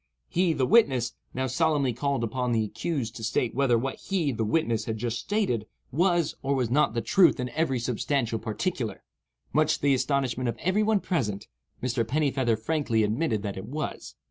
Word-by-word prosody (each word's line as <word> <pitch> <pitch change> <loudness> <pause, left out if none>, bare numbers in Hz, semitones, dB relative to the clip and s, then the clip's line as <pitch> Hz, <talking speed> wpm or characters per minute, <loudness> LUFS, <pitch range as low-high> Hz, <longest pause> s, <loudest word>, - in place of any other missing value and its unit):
He 175 -1 +2
(the 135 -4 +1
witness) 130 - +3 0.2
now 130 +1 -2
solemnly 140 -1 +1
called 140 +1 -1
upon 125 +2 -1
the 110 -1 +2
accused 120 +1 -3
to 115 - -8
state 115 +1 0
whether 130 -2 +3
what 135 +4 -3
he 175 -8 -1
(the 115 -2 -2
witness) 115 -3 0
had 110 -1 -3
just 115 +1 -2
stated 185 - -1 0.2
was 175 +2 +2
or 140 +1 0
was 125 -3 0
not 130 -5 +3
the 115 - +1
truth 180 -9 +4
in 125 0 -2
every 135 0 0
substantial 120 0 -1
particular. 115 - -3 0.5
Much 155 +2 +3
to - - -11
the 140 -1 +4
astonishment 130 -2 0
of - - -4
every 185 +4 +1
one 215 -2 +2
present, 110 - -2 0.4
Mr. 120 -2 +1
Pennifeather 130 -2 +1
frankly 120 -3 0
admitted 110 0 0
that 100 -2 -4
it 95 - -6
was. 150 +1 -5
130 Hz, 185 wpm, -27 LUFS, 115-155 Hz, 0.5 s, truth